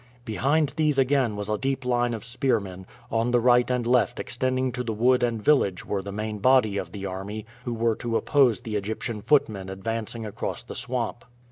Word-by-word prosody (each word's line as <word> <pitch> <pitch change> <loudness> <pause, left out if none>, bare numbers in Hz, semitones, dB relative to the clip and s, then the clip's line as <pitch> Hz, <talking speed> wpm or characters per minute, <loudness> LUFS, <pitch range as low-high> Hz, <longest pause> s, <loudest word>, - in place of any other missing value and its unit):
Behind 140 +7 +1
these 150 -3 +2
again 135 -4 +2
was 105 0 -4
a 105 0 -1
deep 135 -1 -2
line 120 -1 +1
of 110 - -8
spearmen; 115 -7 -2 0.2
on 115 +1 +1
the 120 0 +3
right 125 +1 +4
and 125 -2 0
left 125 +1 +2
extending 130 +1 -1
to 125 +1 -3
the 115 -2 -2
wood 125 +3 +3
and 120 -2 0
village 105 -7 +2
were 100 -2 -2
the 100 +1 -7
main 105 +1 -4
body 125 -3 +4
of 85 - -6
the 100 0 -6
army, 100 +3 -5 0.2
who 120 - -2
were 115 0 +1
to 115 -2 -1
oppose 135 -6 +3
the 110 -2 -5
Egyptian 105 +2 -4
footmen 105 -9 +1
advancing 115 +3 -4
across 110 +4 -4
the - - -8
swamp. 125 -2 -2
115 Hz, 200 wpm, -26 LUFS, 105-125 Hz, 0.2 s, right